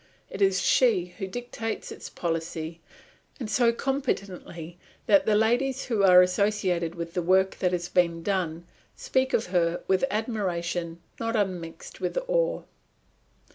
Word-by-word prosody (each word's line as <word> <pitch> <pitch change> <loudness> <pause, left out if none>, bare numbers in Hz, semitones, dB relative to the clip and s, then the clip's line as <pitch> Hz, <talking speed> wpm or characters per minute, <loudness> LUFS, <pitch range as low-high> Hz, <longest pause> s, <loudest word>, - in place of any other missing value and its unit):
It 195 - -6
is 195 -1 +3
she 185 -9 +3
who 195 - -3
dictates 225 +1 -5
its - - -8
policy, 165 -1 -4 0.6
and 240 - -4
so 240 -2 +4
competently 190 - -3 0.3
that 290 -3 +4
the 215 - +4
ladies 245 +5 +1
who 225 -5 0
are 180 -2 +8
associated 180 -3 0
with 170 -1 -6
the 180 - 0
work 190 +2 +3
that 180 - +1
is 175 -1 -2
being 170 -2 +1
done 175 -3 -1 0.3
speak 260 0 0
of 220 - +1
her 170 -1 +1
with 190 +4 +2
admiration 175 -7 -2 0.2
not 230 0 -1
unmixed 180 -6 -3
with - - -2
awe. - - +1
190 Hz, 140 wpm, -27 LUFS, 170-225 Hz, 0.6 s, are